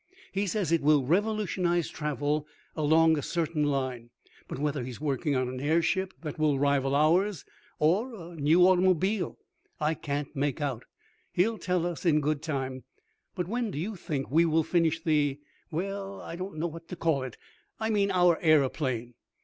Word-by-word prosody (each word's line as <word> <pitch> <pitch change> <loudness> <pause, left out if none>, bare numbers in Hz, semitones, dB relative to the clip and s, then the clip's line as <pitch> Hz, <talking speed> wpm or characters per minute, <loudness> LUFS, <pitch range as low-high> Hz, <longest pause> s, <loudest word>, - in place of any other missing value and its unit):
He 200 +1 -1
says 185 -3 -1
it 165 - +3
will 145 -1 +4
revolutionize 180 - +1
travel 150 0 -2 0.3
along 160 +1 +4
a - - -3
certain 160 +1 -1
line, 130 -4 -2 0.4
but - - -6
whether 145 -1 -1
he 125 - -5
is 120 - -8
working 145 0 -1
on 130 -1 +1
an 130 +1 -5
airship 170 +6 +1
that 155 -2 -6
will 150 -3 +2
rival 140 -1 +2
ours, 170 +5 +2 0.3
or 205 +11 +1 0.2
a - - -11
new 165 +4 +5
automobile, 185 +2 +2 0.4
I 155 +1 +1
can't 145 -2 -4
make 140 0 -1
out. 135 -6 -3 0.5
He'll 215 +5 +1
tell 180 -2 0
us 175 -2 -4
in 160 -4 +4
good 150 0 -1
time. 135 -4 -3 0.5
But 180 -3 -2
when 235 +2 -1
do 145 - -6
you 200 +8 -3
think 145 -7 -4
we 165 +3 +5
will 160 -1 +2
finish 165 -1 +1
the 145 -4 +1 0.3
well, 195 +4 -4
I - - -7
don't 185 -1 -6
know 160 - -1
what 165 0 -6
to - - -6
call 160 -5 +1
it 130 -3 -6 0.4
I 220 0 -1
mean 200 -2 +2
our 180 -3 +4
aeroplane?" 135 -6 +2
160 Hz, 175 wpm, -28 LUFS, 145-180 Hz, 0.5 s, new